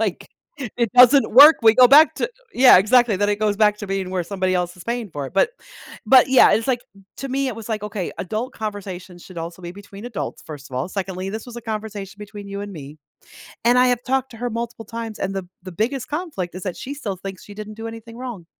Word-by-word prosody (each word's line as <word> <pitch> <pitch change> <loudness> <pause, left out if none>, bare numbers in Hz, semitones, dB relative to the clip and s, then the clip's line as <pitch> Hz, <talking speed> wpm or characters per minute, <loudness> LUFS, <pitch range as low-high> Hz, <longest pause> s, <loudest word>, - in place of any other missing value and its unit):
Like, - - -3 0.5
it 235 -3 0
doesn't 250 +2 +6
work, 290 +5 +9
we 225 0 +6
go 255 -1 +8
back 300 +3 +7
to - - -1 0.3
yeah, 250 -7 +8
exactly 230 +1 +3
then 205 +2 0
it 205 0 0
goes 210 -2 0
back 210 -1 +3
to 205 - -6
being 195 -1 -3
where 185 -1 -1
somebody 185 -1 -1
else 175 0 -2
is 180 - -11
paying 235 -4 -3
for 145 -2 -5
it, - - -11
but 195 - +3 0.6
but, 260 +2 +6
yeah, 260 - +6
it's 225 +2 +1
like, 255 -3 0 0.4
to 275 - -5
me, 270 +1 -1
it 250 - -4
was 225 -1 -9
like, 215 -2 -3
okay, 200 -4 -4
adult 215 +7 -4
conversations 190 -4 -7
should 180 -3 -11
also 170 +2 -7
be 175 - -6
between 200 +2 -12
adults, 230 - -6
first 145 -4 -9
of 130 - -9
all. 130 +8 -2
Secondly, 190 -1 -4
this 220 +3 -6
was 240 -1 -10
a - - -6
conversation 210 -3 -6
between 205 -1 -10
you 200 0 -5
and 205 0 -8
me 150 -2 -10 0.7
and 240 +1 +4
I 255 - +5
have 245 -1 0
talked 265 0 -1
to 230 - -12
her 245 +1 -3
multiple 230 -1 -5
times, 230 -1 -7
and 195 0 -2
the 190 -2 -5 0.2
the 185 - -8
biggest 240 +8 -2
conflict 295 - -4
is 185 - -7
that 185 -3 -4
she 275 - -6
still 220 -9 -5
thinks 190 +1 -8
she 205 - -11
didn't 215 0 -8
do 225 +1 -7
anything 230 0 -10
wrong. 240 -9 -7
215 Hz, 245 wpm, -21 LUFS, 190-245 Hz, 0.7 s, work